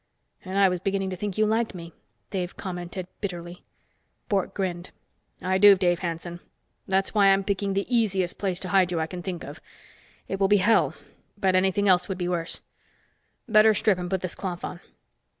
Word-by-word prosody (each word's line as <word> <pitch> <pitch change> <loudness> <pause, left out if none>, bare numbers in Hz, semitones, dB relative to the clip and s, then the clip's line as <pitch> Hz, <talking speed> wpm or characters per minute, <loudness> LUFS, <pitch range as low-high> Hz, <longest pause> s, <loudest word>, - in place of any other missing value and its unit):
"And 190 0 -4
I 200 -1 +6
was 180 -1 -1
beginning 195 +1 -1
to - - -3
think 200 +1 -4
you 215 - +4
liked 220 -1 0
me," 170 -2 -9 0.4
Dave 180 -2 -3
commented 180 -1 -5
bitterly. 175 -3 -6 0.7
Bork 195 -2 0
grinned. 180 -2 -3 0.5
"I 190 +1 +1
do, 205 0 +9
Dave 175 -2 +1
Hanson. 175 0 -5 0.5
That's 190 0 +1
why 205 -2 +5
I'm 195 0 +4
picking 200 0 -1
the 200 - 0
easiest 195 -6 0
place 185 -3 -1
to 185 - -4
hide 185 -1 +3
you 170 - -1
I 160 - 0
can 175 +2 -7
think 175 -1 -5
of. - - -9 0.7
It 195 - -3
will 195 - +3
be 205 +1 +5
hell, 210 +4 +3 0.4
but 190 -2 +2
anything 190 +2 +2
else 180 -1 +4
would 190 - -3
be 175 -1 -2
worse. 175 -1 -1 0.8
Better 215 -1 +5
strip 205 -3 +2
and 180 0 -4
put 190 -1 -1
this 185 - -3
cloth 180 -3 -5
on." 175 - -7
190 Hz, 190 wpm, -26 LUFS, 180-200 Hz, 0.8 s, do